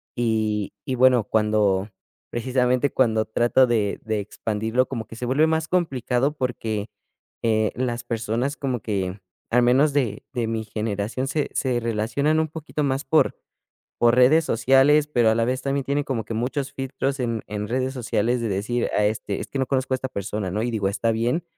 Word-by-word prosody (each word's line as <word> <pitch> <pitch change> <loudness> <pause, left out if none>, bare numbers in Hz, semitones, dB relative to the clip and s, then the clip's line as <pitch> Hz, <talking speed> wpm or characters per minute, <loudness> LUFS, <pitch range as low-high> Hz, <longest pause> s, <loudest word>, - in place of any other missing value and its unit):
y 110 -4 0
y 130 - -1
bueno, 125 -2 +5
cuando 105 -2 +1 0.4
precisamente 125 +2 +1
cuando 110 -4 +2
trato 120 +3 +3
de 110 -4 0
de 110 -1 -1
expandirlo 110 +4 -1
como 115 -4 -4
que - - -11
se 125 - -5
vuelve 140 +6 +3
más 160 0 0
complicado 135 -6 0
porque, 115 -4 -3 0.5
eh, 110 -1 +2
las 120 -2 -2
personas 120 +4 -2
como 130 -5 -2
que 95 -2 -2 0.3
al 120 +1 +4
menos 135 +5 +4
de 130 -7 -1
de 120 -2 -1
mi 110 0 -2
generación 105 +3 -3
se 150 +1 -1
se 125 -3 0
relacionan 115 +7 0
un 160 - +1
poquito 155 -1 -4
más 135 +1 -1
por 160 - +2 0.6
por 120 0 +4
redes 130 +6 +5
sociales, 135 +5 +4
pero 120 -6 +3
a 110 - +3
la 115 0 +2
vez 130 +2 -1
también 140 -1 -1
tiene 140 +1 0
como 115 -6 -2
que 115 - -5
muchos 130 +5 -2
filtros 135 +1 -3
en 115 -3 -2
en 105 0 -4
redes 130 +2 -1
sociales 120 -1 0
de 115 - -1
decir: 110 +5 -1
"A 105 - +3
este 105 -1 -2
es - - -6
que 140 - -4
no 130 - 0
conozco 130 -1 0
a - - +4
esta 130 - -4
persona", 100 -2 -3
¿no?, 105 +4 -1
y 120 - -1
digo 105 -4 0
está 115 +3 0
bien, 120 +9 0
120 Hz, 190 wpm, -23 LUFS, 110-135 Hz, 0.6 s, bueno